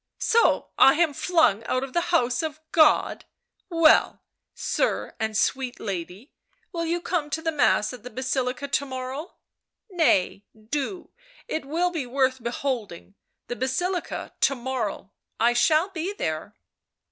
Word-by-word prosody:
" - - -61 0.2
So 465 - +3
I 270 - +8
am 325 -2 +2
flung 315 - +2
out 255 +2 0
of 270 -1 -7
the 345 - +2
house 250 -8 +2
of 310 -1 -4
God 310 -2 +3 0.2
— - - -47
well, 310 - +5 0.3
sir - - -1
and 220 -1 -1
sweet 260 +2 0
lady, 190 - -6 0.4
will 335 -2 -2
you 340 +1 0
come 335 -4 -2
to 315 +2 -2
the 325 0 -1
Mass 250 -7 +2
at 250 - -10
the 250 - -9
Basilica 255 +2 -2
to 280 0 0
morrow? 260 +5 -6 0.3
— - - -61
nay, 235 - +2 0.2
do, 285 - -4 0.4
it 315 - -3
will 340 +5 0
be 310 -7 -3
worth 260 0 +1
beholding 235 -6 -4 0.2
— - - -55
the 245 - -4
Basilica 350 +9 -2
to 275 - +3
morrow! 240 -6 -4 0.3
I 235 +1 +4
shall 310 +8 +3
be 370 +1 -4
there. 155 - -4
270 Hz, 160 wpm, -25 LUFS, 240-320 Hz, 0.4 s, I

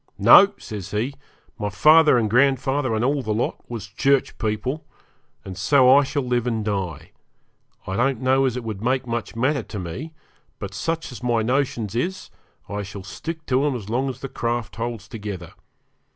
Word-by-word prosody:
'No!' 200 0 +8
he 105 -3 -7
says, 105 +8 -3 0.5
'my 105 - -1
father 150 +6 +6
and 115 -2 +1
grandfather, 135 +1 +2
and 110 +2 0
all 140 +1 +1
the 110 -4 -2
lot, 115 - -1
was 115 -4 -5
Church 135 +7 +1
people, 125 +7 -2 0.6
and 95 - -7
so 130 +7 +5
I 145 - +6
shall 140 +1 -2
live 125 -1 0
and 110 -3 -1
die. 95 -7 -3 0.7
I 95 - -3
don't 130 -1 +1
know 130 +1 +3
as 125 -2 0
it 125 - -4
would 110 -3 -5
make 130 +3 0
much 115 -2 -4
matter 135 +4 +1
to 105 - -8
me, 100 - -6 0.4
but - - -7
such 165 -2 -3
as 125 - -9
my 120 -2 +1
notions 120 -4 -1
is, 180 +11 -3 0.4
I 105 0 -4
shall 100 -1 -8
stick 160 - -7
to 130 +1 +1
'em 145 -3 +1
as 105 -4 -7
long 130 +3 0
as 130 -1 -7
the 135 - -4
craft 120 -2 -3
holds 115 -3 -4
together. 100 -7 -7
120 Hz, 185 wpm, -23 LUFS, 105-135 Hz, 0.7 s, No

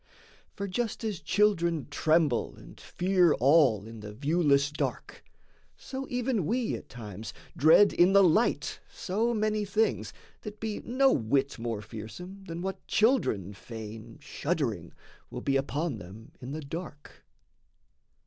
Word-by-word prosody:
For 200 - -4
just 225 +4 -3
as 210 -6 -2
children 170 -3 +1
tremble 155 -4 +2
and - - -14
fear 180 -3 +2
all 130 -6 +4
In 115 0 -10
the 105 0 -8
viewless 145 +3 +2
dark, 150 - -4 0.5
so 270 0 -6
even 245 - -1
we 240 +1 0
at - - -7
times 105 -3 -8 0.2
Dread 160 +7 +6
in 180 +2 +4
the 200 0 +7
light 190 +7 +2
so 220 +5 -1
many 215 0 0
things 215 +2 0 0.3
that 210 -1 -8
be 220 -1 -3
No 265 +2 +2
whit 135 +3 0
more 115 -3 -3
fearsome 175 - -9
than 170 -1 -6
what 190 0 -5
children 210 - +2
feign, 110 +1 -9
Shuddering, 125 - -3 0.4
will - - -6
be 135 - 0
upon 135 0 -1
them 100 +5 -12
in 125 +2 -7
the 155 +2 -4
dark. 150 0 -8
160 Hz, 140 wpm, -29 LUFS, -, 0.5 s, the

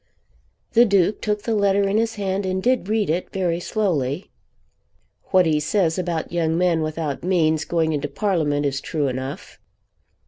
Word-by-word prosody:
The 235 - +7
Duke 200 -2 +2
took 210 -1 -1
the 230 - -1
letter 200 -1 +2
in 200 +2 +1
his 225 0 0
hand 195 -1 -2
and 190 0 -2
did 250 -5 +1
read 215 -1 +1
it, 170 +4 -1
very 175 -3 -1
slowly. 175 - -1 0.9
"What 185 -2 +3
he 155 -2 +2
says 165 +2 +1
about 170 -3 -3
young 165 -1 0
men 175 -2 +2
without 155 -2 -3
means 160 -4 +1
going 160 -2 0
into 145 -1 -2
Parliament 150 -6 0
is 135 -1 -1
true 150 -3 -1
enough." 130 +1 -6
175 Hz, 165 wpm, -22 LUFS, 155-200 Hz, 0.9 s, The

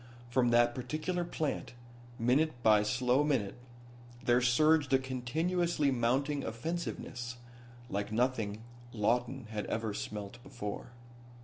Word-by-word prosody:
From 125 -1 +3
that 120 0 +4
particular 155 +8 -2
plant, 155 -6 -3 0.4
minute 125 +2 +1
by 105 -1 +6
slow 125 +5 +2
minute, 125 -10 +1 0.7
there 120 +1 +4
surged 145 +4 +4
a - - +8
continuously 145 +5 0
mounting 135 +4 +1
offensiveness, 125 -1 -4 0.5
like 100 -2 -3
nothing 110 -3 0 0.3
Lawton 120 +4 0
had 105 -1 -3
ever 110 -2 -2
smelt 105 +3 -6
before. 120 -6 -6
125 Hz, 110 wpm, -32 LUFS, 115-145 Hz, 0.7 s, a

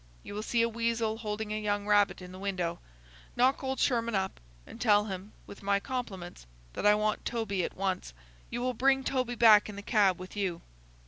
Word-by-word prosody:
You - - -8
will 210 - -3
see 230 +1 +1
a - - +3
weasel 230 -1 -1
holding 210 -1 -3
a 215 - -2
young 205 -1 -1
rabbit 205 -2 +3
in 180 - -10
the 185 - -10
window. 180 -4 -2 0.6
Knock 260 +3 +3
old 265 0 -2
Sherman 235 -3 +1
up, 190 0 -2 0.3
and 230 - -12
tell 210 -3 +4
him, 195 0 -6
with 200 - -11
my 200 0 +2
compliments, 195 - -6 0.3
that - - 0
I 210 - +7
want 215 0 0
Toby 200 -6 -1
at - - -5
once. 190 - -2 0.4
You 240 - -3
will 255 0 0
bring 270 +3 +3
Toby 255 -2 -1
back 215 -2 +6
in 210 - -7
the 200 - -8
cab 200 -4 +3
with 185 +2 -9
you." 185 -5 -2
210 Hz, 205 wpm, -30 LUFS, 195-235 Hz, 0.6 s, I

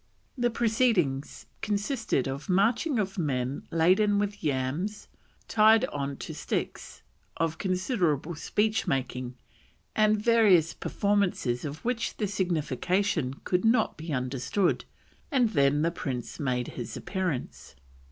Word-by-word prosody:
The 240 -2 +1
proceedings 220 - +1 0.2
consisted 210 - -1
of 135 +5 -5
marching 230 - +2
of 195 -2 -2
men 135 -4 -2
laden 190 +5 +3
with 205 -2 -2
yams 150 +9 -2 0.4
tied 220 0 +5
on 140 -1 -4
to - - -6
sticks, - - -4 0.3
of 165 -1 -1
considerable 180 - 0
speech 210 +6 0
making, 130 -4 -2 0.6
and 215 0 +3
various 210 -7 +4
performances 195 -12 0
of 150 +6 -7
which 240 -2 -1
the 210 - 0
signification 175 -4 0
could 180 0 0
not 225 0 +3
be 160 +1 -7
understood, 135 +8 0 0.4
and 255 -6 +3
then 145 -3 +3
the 170 - +2
prince 135 -8 -5
made 125 -4 -1
his 120 -3 -6
appearance. 150 - -4
180 Hz, 120 wpm, -28 LUFS, 140-210 Hz, 0.6 s, tied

